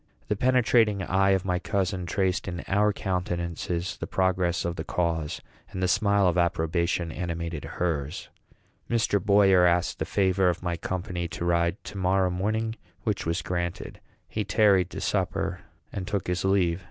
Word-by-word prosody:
The 105 - +2
penetrating 115 -4 +3
eye 95 +2 +2
of 95 -1 +2
my 90 -1 0
cousin 95 -2 -1
traced 95 +1 0
in 85 -1 -4
our 105 +2 +3
countenances 90 -2 -3
the - - -5
progress 90 -3 +1
of 85 0 -2
the 80 - -4
cause, 80 -3 -2 0.3
and 95 - -4
the - - +3
smile 100 0 +3
of 90 0 +2
approbation 85 0 0
animated 85 -2 -4
hers. 75 -5 -3 0.6
Mr. 110 -4 +1
Boyer 100 -3 +5
asked 85 0 +1
the - - -1
favor 95 -1 +2
of 85 0 -3
my 85 -1 -1
company 90 0 -3
to 85 - -5
ride 85 +2 +1
to 100 - -7
morrow 95 0 +2
morning; 110 +5 -1 0.3
which 105 -6 -1
was 85 +2 -1
granted. 85 0 -4 0.3
He 105 - -2
tarried 100 -4 +3
to - - -6
supper, 95 -1 -1 0.3
and 95 -2 -4
took 100 -3 -2
his 90 0 -1
leave. 95 -3 +2
90 Hz, 165 wpm, -27 LUFS, 85-100 Hz, 0.6 s, Boyer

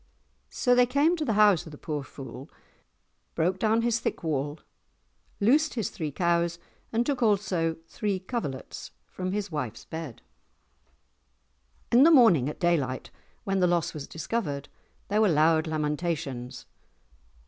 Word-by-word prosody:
So 245 - +2
they 245 0 +5
came 285 +7 +3
to 315 - -2
the 235 -7 0
house 205 -6 +5
of - - -9
the 150 - -10
poor 150 -1 -4
fool, 135 0 -10 0.9
broke 180 +3 0
down 225 +2 +2
his 235 -1 +1
thick - - -3
wall, 150 -1 -2 0.8
loosed 290 +9 +3
his 225 -5 -2
three 155 -3 -4
cows, 170 +1 +1 0.3
and 235 +1 +1
took 280 -2 -1
also 190 -7 +1
three 205 -1 -2
coverlets 185 - -5 0.2
from 185 0 -5
his 205 -1 -3
wife's 130 -8 -4
bed. 160 -7 -7 1.7
In 240 - +6
the 310 - +8
morning 225 - +6
at - - -8
daylight 150 -8 0 0.3
when 195 -1 0
the 180 - +4
loss 175 -2 0
was 145 -2 -7
discovered, 160 -5 -3 0.4
there 210 +2 +1
were 215 - +4
loud 160 0 +3
lamentations. 150 -5 -3
175 Hz, 145 wpm, -27 LUFS, 150-220 Hz, 1.7 s, the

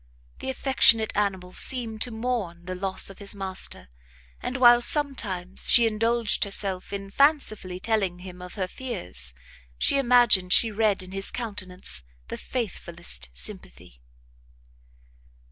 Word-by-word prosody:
The - - -5
affectionate 245 -4 +3
animal 190 -3 -2
seemed 230 -4 0
to - - 0
mourn 220 -7 -4
the 185 - -5
loss 190 +1 0
of 195 - -15
his 200 0 0
master, 190 - -2 0.5
and 255 - -4
while 240 -1 +6
sometimes 215 - 0
she 235 - +7
indulged 225 0 +1
herself 195 -2 -1
in 195 -1 -6
fancifully 215 - +1
telling 195 -4 -1
him 180 0 -11
her 180 +1 -5
fears, 90 - -5 0.4
she 275 - +2
imagined 240 -8 +5
she 225 - +5
read 210 -2 0
in 185 - -11
his 195 0 0
countenance 190 - -4 0.3
the - - -5
faithfullest 170 - -4
sympathy. - - -6
200 Hz, 130 wpm, -25 LUFS, 180-235 Hz, 0.5 s, she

